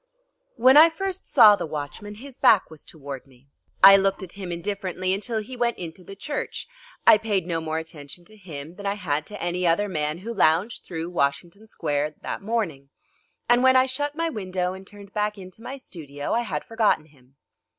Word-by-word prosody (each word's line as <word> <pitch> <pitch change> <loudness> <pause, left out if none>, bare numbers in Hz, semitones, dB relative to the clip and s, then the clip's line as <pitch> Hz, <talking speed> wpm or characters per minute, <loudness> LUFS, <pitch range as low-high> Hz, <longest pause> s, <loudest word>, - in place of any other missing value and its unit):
When 260 +3 +6
I 320 +2 +9
first 380 +3 -4
saw 220 -6 +8
the 185 - -5
watchman 155 +8 -6
his 265 +4 -11
back 210 -9 +4
was 155 - -11
toward 140 -4 -9
me. 135 +1 -23 0.3
I 195 0 +11
looked 195 0 0
at 180 - -9
him 190 -3 -7
indifferently 185 +1 -2
until 220 +4 -2
he 255 +4 -9
went 240 -1 0
into 175 +1 -8
the 195 +3 -10
church. 290 +9 -5 0.4
I 215 - +8
paid 205 -5 -1
no 165 -2 -2
more 160 0 -3
attention 160 +1 -9
to 215 - -17
him 165 -5 -10
than 200 -1 -5
I 200 - 0
had 155 -6 -2
to 210 - -7
any 175 +1 -1
other 170 +5 +2
man 150 -4 -2
who 220 +6 -6
lounged 185 +2 +2
through 165 0 -5
Washington 175 +7 -2
Square 150 -5 -2
that - - -4
morning, 195 -11 -3 0.6
and 240 +1 +4
when 260 0 +5
I 255 0 +6
shut 290 +3 -3
my 330 +1 -1
window 185 - -3
and 190 0 -11
turned 200 -1 -13
back 210 0 -1
into 185 +2 -12
my 265 +4 -7
studio 145 - -6
I 235 - +2
had 155 -10 -4
forgotten 220 -8 +1
him. 135 -3 -25
190 Hz, 200 wpm, -24 LUFS, 160-220 Hz, 0.6 s, I